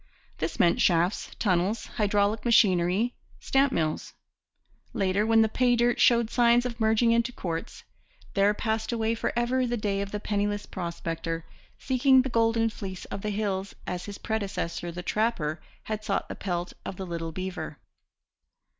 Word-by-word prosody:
This - - -3
meant 170 - +4
shafts, 175 +2 +2
tunnels, 195 +2 +1
hydraulic 205 0 0
machinery, 205 -1 +3 0.3
stamp 270 0 +2
mills. 155 -6 -2 0.8
Later, 195 +2 +1
when 225 0 +5
the - - +3
pay 245 +2 +2
dirt 240 0 +2
showed 235 -2 +4
signs 240 0 +4
of 240 -1 -4
merging 225 +1 +3
into 235 +2 +2
quartz, 165 -8 -5 0.5
there 200 0 +4
passed 220 +1 -1
away 225 -1 0
for 230 - -1
ever 245 +2 +1
the 240 0 -1
day 200 -2 -1
of 200 - -3
the 210 - -3
penniless 205 0 -1
prospector 165 -2 -4 0.3
seeking 260 0 +4
the 265 - -3
golden 225 -1 +2
fleece 190 -3 -7
of 195 - -4
the 210 - -2
hills 200 -2 -2
as 180 0 -4
his 205 -1 -7
predecessor, 195 -6 -3
the 175 +1 -7
trapper, 180 -7 -1 0.2
had 215 -1 -4
sought - - -1
the - - -5
pelt 175 -2 -3
of - - -5
the 190 - -5
little 165 -2 -4
beaver. 185 +2 -5
210 Hz, 160 wpm, -27 LUFS, 185-230 Hz, 0.8 s, when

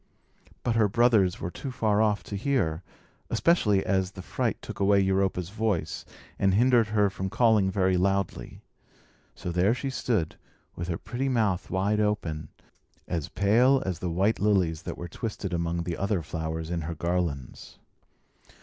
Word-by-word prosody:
But 120 - 0
her 110 -2 +4
brothers 110 -4 +3
were 85 - -4
too 135 - -6
far 110 -4 +1
off 105 -2 +1
to 100 - -6
hear; 100 - 0 0.5
especially 105 - +2
as 95 0 0
the 95 - -9
fright - - -2
took - - -8
away 100 0 +4
Europa's 95 -2 0
voice, 95 -9 -2 0.3
and 95 -1 +3
hindered 120 0 +4
her 105 -2 +2
from 95 0 -4
calling 110 -3 +3
very 95 -1 +2
loudly. 95 -9 -1 0.7
So 90 - -5
there 90 +6 +2
she 135 +2 -3
stood, 110 -11 -1 0.4
with 85 - -5
her 85 -2 -2
pretty 130 +4 -3
mouth 110 -7 0
wide 100 +3 +1
open, 105 -8 -1 0.6
as 80 -5 -3
pale 125 +7 +3
as 90 -3 -2
the 90 - -2
white 95 +6 +1
lilies 90 -6 +2
that - - -5
were 85 - -6
twisted 100 0 -5
among 85 0 -1
the 85 0 -4
other 100 -3 0
flowers 80 +1 -4
in 85 -1 -1
her 85 +2 -4
garlands. 85 -6 -3
95 Hz, 160 wpm, -27 LUFS, 85-110 Hz, 0.7 s, her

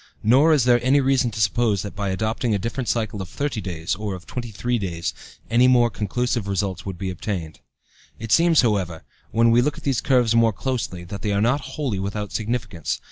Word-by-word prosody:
Nor 135 +9 +5
is 150 -5 +4
there 120 -1 +3
any 135 +3 +4
reason 135 -2 +2
to 110 0 -7
suppose 105 -1 +1
that 100 - -7
by 100 -1 -2
adopting 110 +3 -1
a - - +1
different 115 +5 -3
cycle 110 -3 -1
of 95 - -7
thirty 140 -3 -3
days, 85 -3 -3
or 100 0 -3
of 90 - -11
twenty 120 -2 -5
three 120 +3 -1
days, 85 -3 -3 0.3
any 120 +3 +4
more 120 -2 +4
conclusive 115 +1 -2
results 95 -2 -2
would 95 -2 -5
be 95 0 -3
obtained. 90 -3 -5 0.6
It 115 -1 -7
seems, 165 -1 +5
however, 95 -8 0 0.3
when 115 +1 +3
we 120 +1 +5
look 145 +3 -1
at - - -11
these 135 -4 0
curves 125 -4 +3
more 115 -1 +4
closely, 110 -6 -3
that 100 +3 -7
they 105 - -1
are 100 - +1
not 125 +7 +2
wholly 130 -10 -2
without 100 +1 -4
significance. 110 - -3
110 Hz, 210 wpm, -23 LUFS, 100-125 Hz, 0.6 s, Nor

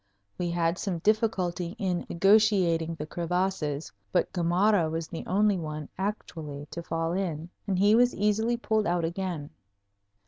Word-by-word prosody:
We 175 -1 0
had 170 0 0
some 190 -4 -2
difficulty 185 -3 0
in 185 -5 -1
negotiating 180 -4 +3
the 150 - -5
crevasses, 170 -3 -2 0.2
but 180 - +1
Gamarra 175 0 +3
was 165 0 -3
the 165 - -6
only 205 0 +3
one 155 -2 -5
actually 160 -7 -4
to 170 - -5
fall 165 0 -2
in, 175 -3 -3 0.2
and 190 -2 0
he 205 +3 +5
was 245 +2 +4
easily 220 +3 +1
pulled 220 -2 0
out 175 -1 +1
again. 170 -4 -4
175 Hz, 145 wpm, -28 LUFS, 165-205 Hz, 0.2 s, he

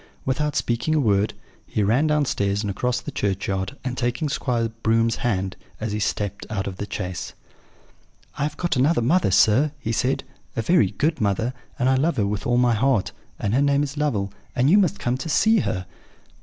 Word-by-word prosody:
Without 150 +3 0
speaking 120 +7 0
a - - +3
word, 105 -5 +2 0.3
he 105 - 0
ran 120 +10 +3
downstairs, 110 -9 +1
and 100 - -1
across 125 +5 -1
the - - -7
churchyard; 95 +4 -2
and, 125 -1 -3
taking 125 +5 -1
Squire 120 -4 0
Broom's 115 0 +2
hand, 95 -6 -1 0.2
as 110 -1 -3
he 105 - -2
stepped 100 -1 -2
out 100 -3 -2
of 95 -1 -5
the 100 - -4
chaise: 90 -3 -4 1.0
"'I - - -6
have 150 +1 -1
got 175 -3 0
another 135 0 +3
mother, 165 - +3
sir,' 110 +10 +4
he 115 -5 -4
said, 125 +4 0 0.3
'a 115 - -1
very 170 - +4
good 155 - -1
mother; 110 +4 0 0.2
and 125 - +1
I 130 - +4
love 160 +6 +1
her 105 - +2
with 105 +3 -2
all 120 0 +2
my 125 -1 +4
heart; 115 -2 +1 0.3
and 100 - -1
her 135 - +3
name 140 0 +3
is 140 0 -4
Lovel; 110 -10 -1 0.2
and 130 +5 +3
you 205 - +7
must 200 0 +2
come 120 +1 -1
to 160 - -5
see 220 +7 +4
her.' 90 - -2
120 Hz, 200 wpm, -23 LUFS, 105-145 Hz, 1.0 s, you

